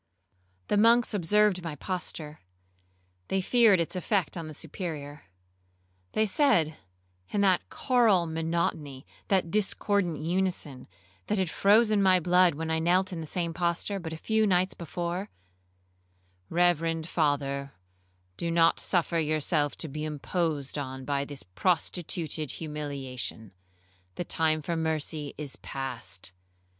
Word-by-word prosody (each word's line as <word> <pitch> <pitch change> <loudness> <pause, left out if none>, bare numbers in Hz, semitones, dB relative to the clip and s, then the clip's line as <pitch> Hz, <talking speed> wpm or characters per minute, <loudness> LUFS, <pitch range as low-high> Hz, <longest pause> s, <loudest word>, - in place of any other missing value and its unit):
The 210 - +2
monks 230 +2 +5
observed 205 0 +3
my 165 -3 -4
posture,—they 90 - -7
feared 220 -2 +5
its 170 +2 -1
effect 185 -1 0
on 165 -3 -5
the 155 - -8
Superior. 150 - -6 0.9
They 215 - +2
said, 190 - +3 0.5
in 205 - 0
that 190 -3 +2
choral 230 -9 +3
monotony,—that 160 +1 -2
discordant 200 -4 +1
unison 165 -5 -2 0.4
that 210 - 0
had 185 -4 0
frozen 215 +1 +4
my 185 -1 +5
blood 180 -1 +4
when 160 +1 -3
I 160 - +1
knelt 180 +3 +2
in 165 - -4
the 160 - -6
same 170 0 -2
posture 175 +3 -1
but 165 -3 -6
a 160 - -5
few 220 +5 +1
nights 185 -1 +2
before, 175 +4 -4 1.2
'Reverend 165 -2 +1
father, 140 -4 0 0.6
do 170 - -2
not 165 0 +4
suffer 170 -2 +1
yourself 155 -1 0
to 160 - -2
be 150 +1 -5
imposed 150 -1 -2
on 130 -1 -6
by 140 0 0
this 140 -2 -7
prostituted 160 - 0
humiliation,—the 110 - -7
time 155 -2 +1
for 170 +3 -2
mercy 155 -2 -2
is 145 -3 -6
past. 120 -9 -5
165 Hz, 125 wpm, -28 LUFS, 145-185 Hz, 1.2 s, monks